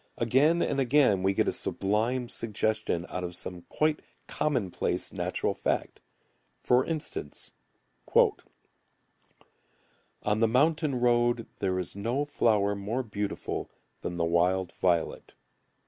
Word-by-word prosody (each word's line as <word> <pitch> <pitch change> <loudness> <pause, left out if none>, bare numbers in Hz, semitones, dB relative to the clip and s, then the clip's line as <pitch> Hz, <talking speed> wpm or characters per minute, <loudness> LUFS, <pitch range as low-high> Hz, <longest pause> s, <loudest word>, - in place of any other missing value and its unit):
Again 140 +9 +3
and 140 - -1
again 130 -7 +4
we 95 +1 +1
get - - +2
a - - +3
sublime 115 +5 0
suggestion 110 -5 -1
out 90 - -4
of 90 0 -5
some 90 0 -6
quite 155 0 +1 0.3
commonplace 120 -12 -1
natural - - -1
fact. - - -2 0.6
For 125 +1 +4
instance: 150 - -5 2.7
"On 105 +1 +1
the 115 - +4
mountain 145 +2 +2
road 120 -1 +2
There 95 -2 0
is 90 0 -4
no 120 +8 -1
flower 105 -8 +2
more 105 +6 -2
beautiful 105 -3 -4 0.3
Than 85 - -4
the 85 - +1
wild 90 +2 +1
violet." 85 -3 -1
110 Hz, 115 wpm, -28 LUFS, 95-130 Hz, 2.7 s, again